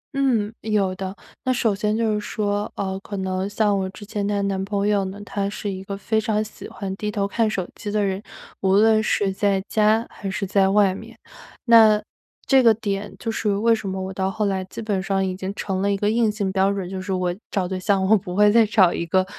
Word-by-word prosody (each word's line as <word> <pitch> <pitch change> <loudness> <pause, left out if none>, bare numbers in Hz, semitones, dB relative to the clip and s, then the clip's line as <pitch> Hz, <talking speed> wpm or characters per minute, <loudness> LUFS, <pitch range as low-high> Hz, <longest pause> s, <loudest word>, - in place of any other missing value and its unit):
嗯， 230 -6 +1
有 205 -4 0
的。 190 +1 -5 0.3
那 260 - +1
首 230 -4 +1
先 210 +2 -1
就 225 -2 +1
是 210 - 0
说， 205 0 -2
呃， 190 -1 -3
可 200 0 -7
能 190 +1 -2
像 205 -1 +1
我 190 0 -2
之 195 +2 -11
前 205 -1 -3
的 200 -1 0
男 195 -1 -1
朋 200 0 -1
友 205 -2 +2
呢， 195 +2 -7
他 200 -1 -2
是 205 0 -5
一 190 0 -6
个 195 0 -5
非 220 +2 0
常 215 0 0
喜 215 - -10
欢 190 -1 -5
低 210 - -3
头 200 -1 -1
看 220 +2 +1
手 185 -4 -3
机 210 - -7
的 205 -1 +1
人， 190 +1 -2 0.4
无 190 0 +3
论 220 +1 +5
是 200 -2 0
在 200 -1 +1
家 220 +2 +2
还 195 - -6
是 195 +1 -2
在 195 0 +3
外 200 -2 +4
面。 225 +4 -10 0.5
那 220 -3 +7 0.5
这 265 -1 +5
个 230 -2 +6
点 205 -2 -3
就 225 - -3
是 210 -2 0
为 230 +3 +3
什 210 -3 -2
么 190 0 -3
我 190 0 -4
到 190 +1 -1
后 210 +2 -1
来 190 -1 -1
基 220 - -8
本 200 -3 -1
上 195 0 0
已 185 -1 -2
经 190 +1 -4
成 190 -2 -2
了 200 0 +1
一 200 - 0
个 205 +2 +1
硬 225 -2 +2
性 200 -3 -2
标 195 +1 +2
准， 195 -3 -3
就 190 0 -5
是 195 0 -5
我 180 -1 0 0.2
找 190 -3 -1
对 185 0 -3
象 190 0 +1
我 220 - +6
不 180 -2 -3
会 210 0 +5
再 230 0 +6
找 190 -5 +4
一 170 - -3
个 185 +2 +2
200 Hz, 265 characters per minute, -22 LUFS, 190-215 Hz, 0.5 s, 那